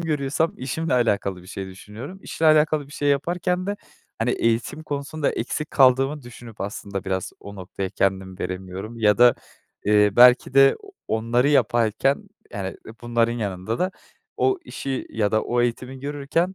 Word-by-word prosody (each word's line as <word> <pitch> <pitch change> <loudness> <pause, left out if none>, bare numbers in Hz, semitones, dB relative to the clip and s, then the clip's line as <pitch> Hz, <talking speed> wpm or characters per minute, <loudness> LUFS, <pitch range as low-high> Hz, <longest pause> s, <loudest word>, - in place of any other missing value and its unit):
görüyorsam 155 0 0
işimle 140 +4 -2
alakalı 100 -6 0
bir - - -16
şey 95 -1 -5
düşünüyorum. 105 - -10
İşle 160 - -1
alakalı 155 -1 +4
bir 145 - -15
şey 145 -1 -1
yaparken 180 +5 0
de, 205 +1 -2 0.4
hani, 115 +2 +1
eğitim 115 +7 0
konusunda 145 0 -2
eksik 150 +6 -3
kaldığımı 135 +2 +4
düşünüp 120 -2 -12
aslında 100 -1 -5
biraz 95 -1 -2
o 100 0 -10
noktaya 95 +1 -5
kendimi 95 -2 -1
veremiyorum 95 +5 -6
ya 105 -1 +3
da, 120 0 +7 0.5
eee, 105 0 +4
belki 125 +2 +6
de 135 0 +6 0.3
onları 115 +4 +1
yaparken, 120 0 +2 0.2
yani, - - -4 0.3
bunların 120 0 +1
yanında 105 -1 -3
da 185 +1 0 0.5
o 390 -1 +2
işi 135 -1 -4
ya 105 -1 0
da 110 - +2
o 120 0 0
eğitimi 125 +2 -3
görürken, 145 +6 -1
120 Hz, 150 wpm, -23 LUFS, 105-145 Hz, 0.5 s, da